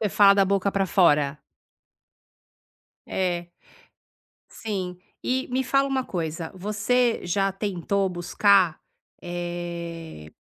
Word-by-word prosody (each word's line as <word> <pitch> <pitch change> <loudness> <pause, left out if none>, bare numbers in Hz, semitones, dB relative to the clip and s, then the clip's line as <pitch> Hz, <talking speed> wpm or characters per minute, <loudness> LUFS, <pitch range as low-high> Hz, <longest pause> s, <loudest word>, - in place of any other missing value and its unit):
Você 210 - +1
fala 200 0 +6
da 195 -1 +4
boca 200 +1 +1
pra 195 -1 +1
fora. 150 -6 +3 1.7
É, 175 -2 -1 1.0
sim. 190 -5 -5 0.3
E 260 +1 -1
me 260 +1 0
fala 275 +2 +2
uma 260 -1 0
coisa, 165 -2 -4
você 215 +5 +1
já 195 +3 +1
tentou 195 0 -1
buscar, 180 0 +3 0.4
eh, 170 - -6
190 Hz, 105 wpm, -25 LUFS, 175-205 Hz, 1.7 s, fala